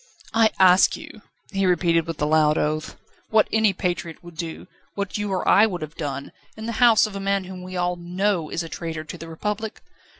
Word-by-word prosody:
"I 225 -1 +5
ask 185 0 +6
you," 215 - -12 0.3
he 195 -1 +1
repeated, 170 -2 +2
with 165 -2 -5
a - - +3
loud 150 0 +3
oath, 155 +1 -2 0.3
"what 220 -1 +4
any 220 -2 +4
patriot 175 -3 -3
would 175 -1 -12
do, 165 -1 -6 0.3
what 200 -1 -3
you 210 -1 -2
or 185 - -1
I 215 +2 +6
would 180 -6 -4
have 155 0 -7
done, 140 -4 -5 0.3
in 220 - -6
the 230 - -2
house 230 -3 +6
of 210 -2 -7
a - - -3
man 195 0 0
whom 185 0 -8
we 185 0 -7
all 180 0 0
know 175 -1 -1
is 170 - -2
a - - -7
traitor 165 -1 -5
to 155 - -8
the 165 - -8
Republic? 210 +6 -4
180 Hz, 220 wpm, -23 LUFS, 165-200 Hz, 0.3 s, ask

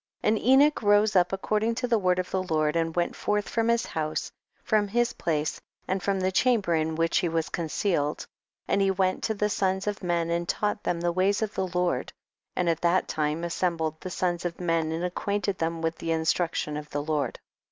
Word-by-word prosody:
5. - - +3
And 215 0 +2
Enoch 275 +4 +4
rose 205 0 +4
up 180 -1 +4
according 215 +4 0
to 250 +1 -1
the 230 -2 +2
word 180 -2 +2
of 185 0 -2
the 190 - 0
Lord, 155 -4 0
and 165 -1 0
went 175 -1 0
forth 210 -1 -1
from 230 -1 0
his 235 0 +2
house, 155 -1 -3 0.3
from 215 -2 +2
his 240 +4 +1
place 155 -2 -2 0.3
and 190 0 -1
from 195 +1 0
the 185 0 +1
chamber 210 -4 +2
in 160 0 0
which 165 +1 +2
he 175 - 0
was 165 0 -1
concealed; 160 -2 -1 0.4
and 200 - +2
he 195 - +3
went 190 -1 +1
to 220 - -1
the 210 +1 +1
sons 190 -2 0
of 205 -1 -2
men 170 -2 0
and 170 +1 -1
taught 210 0 0
them 170 -1 -1
the 175 0 +1
ways 195 +4 +1
of 215 - -3
the 190 - -1
Lord, 180 0 -1 0.4
and 180 - 0
at 165 -1 +1
that 175 +2 +2
time 155 +2 -1
assembled 165 -2 -1
the 185 - -5
sons 175 -1 -1
of 175 -1 -4
men 165 -2 0
and 165 +2 -2
ac 180 - -1
quainted 200 -1 -1
them 165 0 -2
with 165 0 -1
the 165 - -2
instruction 160 -1 0
of 150 0 -7
the 145 0 -3
Lord. 150 -1 -1
180 Hz, 220 wpm, -27 LUFS, 165-205 Hz, 0.4 s, Enoch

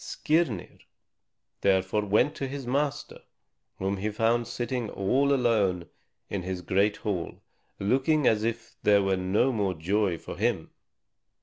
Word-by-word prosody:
Skirnir 150 - -1 0.8
therefore 95 +2 +2
went 110 +8 +2
to 135 - -4
his 135 0 -6
master, 140 +3 -2 0.6
whom 95 +1 -1
he 105 +3 -2
found 115 +2 +1
sitting 120 -2 -3
all 130 +10 +1
alone 105 -10 +1 0.4
in 100 - -3
his 90 0 -5
great 100 +4 +1
hall, 95 -5 -4 0.3
looking 135 +8 +2
as 110 -2 +3
if 115 0 -3
there 100 -1 +4
were 95 0 +2
no 95 +8 +1
more 100 -6 -1
joy 95 +2 0
for - - -9
him. - - -1
105 Hz, 135 wpm, -27 LUFS, 95-125 Hz, 0.8 s, there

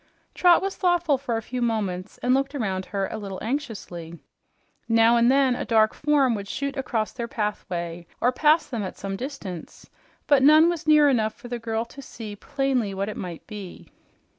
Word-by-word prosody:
Trot 355 0 +5
was 390 0 -2
thoughtful 345 -6 +2
for 245 -4 -2
a 225 - -4
few 250 +2 -4
moments 205 -5 -2
and 250 +1 +3
looked 275 +2 0
around 190 -7 -2
her 195 -1 -2
a - - -4
little 195 -2 -6
anxiously. 205 - -5 0.7
Now 230 +1 +5
and 235 +1 +4
then 270 -2 +3
a - - -3
dark 220 -2 +3
form 290 -4 +2
would 200 -2 -4
shoot 280 +5 -3
across 235 -5 -2
their 235 -2 -5
pathway 175 -6 -4
or 245 - +3
pass 305 +5 +3
them 235 -5 -4
at 190 - -5
some 195 0 -4
distance, 205 - -7 0.4
but 285 -2 +4
none 310 +4 +7
was 335 -3 -4
near 300 -1 +6
enough 220 -6 +1
for 245 - -12
the 240 -1 -3
girl 225 0 -2
to 275 +4 -12
see 220 -5 -8
plainly 250 -3 -1
what 195 +2 -2
it 210 - -6
might 175 -3 -7
be. 205 -4 -9
235 Hz, 190 wpm, -25 LUFS, 200-275 Hz, 0.7 s, none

